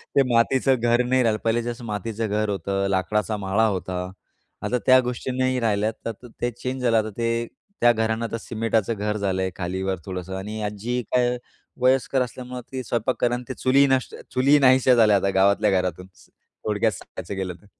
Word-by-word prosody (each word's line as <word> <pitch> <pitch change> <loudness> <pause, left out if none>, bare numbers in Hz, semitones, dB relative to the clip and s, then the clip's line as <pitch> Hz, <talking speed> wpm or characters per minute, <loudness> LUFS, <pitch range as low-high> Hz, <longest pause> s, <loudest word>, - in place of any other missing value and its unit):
ते 140 - +6
मातीचं 130 +3 +3
घर 120 +1 +3
नाही 130 0 +2
राहिलं 110 -2 +1
पहिले 115 +1 +1
जसं 120 0 -5
मातीचं 110 +1 -3
घर 105 0 0
होतं, 100 0 -1
लाकडाचा 105 +3 0
माळा 100 +3 +1
होता, 95 -2 -3 0.6
आता 125 - 0
त्या 130 0 +7
गोष्टी 125 +1 -3
नाही 130 0 +1
राहिल्या. 110 -1 +1
तर 115 - -1
त 115 - -15 0.2
ते 120 - 0
चेंज 125 +2 -5
झालं 115 -2 +3
आता 110 0 +1
ते 115 0 0 0.3
त्या 120 0 +7
घरांना 110 0 -1
आता 115 0 -3
सिमेटाचं 115 -1 -1
घर 105 0 -2
झालंय 95 -2 -1
खाली-वर 95 +1 -2
थोडंसं 95 0 -5
आणि 105 +3 -5
आजी 105 +4 -2
काय 125 0 +2 0.4
वयस्कर 130 +1 +3
असल्यामुळं 125 0 -5
ती 130 -1 -4
स्वयंपाक 120 +2 -1
कर 120 - +3
अन् 125 0 -2
ते - - -2
चुलीही 135 +2 +3
नष्ट 130 -1 0 0.2
चुलीही 140 +3 +4
नाहीशा 130 -1 +5
झाल्या 110 -3 +5
आता 100 0 0
गावातल्या 100 +2 +4
घरातून 90 0 -4
स - - -21
थोडक्यात 105 +1 -3
सांगायचं 100 +2 -8
गेलं 95 -1 -3
तर. - - -22
115 Hz, 190 wpm, -24 LUFS, 100-125 Hz, 0.6 s, त्या